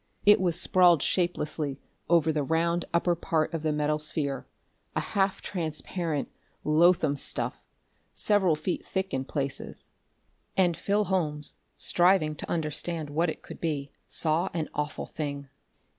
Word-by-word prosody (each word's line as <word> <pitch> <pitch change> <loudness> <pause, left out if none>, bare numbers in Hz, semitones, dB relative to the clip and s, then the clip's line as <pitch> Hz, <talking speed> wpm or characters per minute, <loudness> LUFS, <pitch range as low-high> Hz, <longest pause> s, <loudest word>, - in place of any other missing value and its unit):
It 205 -1 +7
was 175 -2 +2
sprawled 175 -4 +5
shapelessly 155 -5 -1 0.3
over 165 -2 +4
the 150 - +1
round 165 +4 +1
upper 170 +1 +2
part 165 -1 0
of 165 - -2
the 155 0 0
metal 150 0 0
sphere, 145 -2 -2 0.5
a - - +2
half 195 -1 0
transparent, 160 -2 -2 0.4
loathsome 155 -1 +4
stuff, - - -3 0.4
several 195 -6 +3
feet 155 +4 -3
thick 190 0 -3
in 130 0 -1
places. 140 -1 -2 0.7
And 180 -3 +4
Phil 205 +4 +1
Holmes, 155 -7 -1 0.2
striving 175 -3 +3
to - - -7
understand 160 -1 -1
what 165 +3 +1
it - - -6
could - - -10
be, 145 -4 -2 0.2
saw 165 +4 0
an 160 -2 -2
awful 150 +1 -3
thing. 140 -3 -5
160 Hz, 140 wpm, -28 LUFS, 150-175 Hz, 0.7 s, It